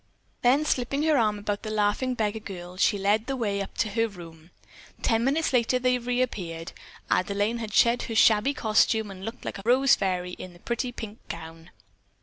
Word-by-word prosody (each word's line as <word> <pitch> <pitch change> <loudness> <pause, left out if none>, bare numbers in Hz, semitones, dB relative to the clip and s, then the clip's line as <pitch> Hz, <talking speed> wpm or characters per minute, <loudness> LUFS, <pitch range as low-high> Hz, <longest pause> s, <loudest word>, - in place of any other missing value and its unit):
Then 270 +5 +3
slipping 275 +1 0
her 315 -1 +3
arm 215 -5 +2
about 205 0 -3
the 220 - -6
laughing 215 +4 0
beggar 220 -1 -1
girl, 180 -3 -8
she 205 +3 +2
led 205 +3 +1
the 270 - -1
way 205 -5 -1
up 195 - -7
to 220 - +1
her 225 +2 +1
room. 165 -5 -12 0.5
Ten 225 -1 +2
minutes 285 +4 +1
later 250 0 +3
they 250 0 +1
reappeared. 215 -10 -2 0.4
Adelaine 205 +5 +1
had 220 -2 -5
shed 235 +3 +4
her 225 - -3
shabby 220 +6 +4
costume 220 -2 +2
and 190 -1 -10
looked 225 +3 -7
like - - -5
a - - -10
rose 260 +4 +4
fairy 180 -2 0
in 180 0 -9
a - - -17
pretty 240 +4 -3
pink 220 -2 -8
gown. 165 0 -9
220 Hz, 190 wpm, -26 LUFS, 195-245 Hz, 0.5 s, shed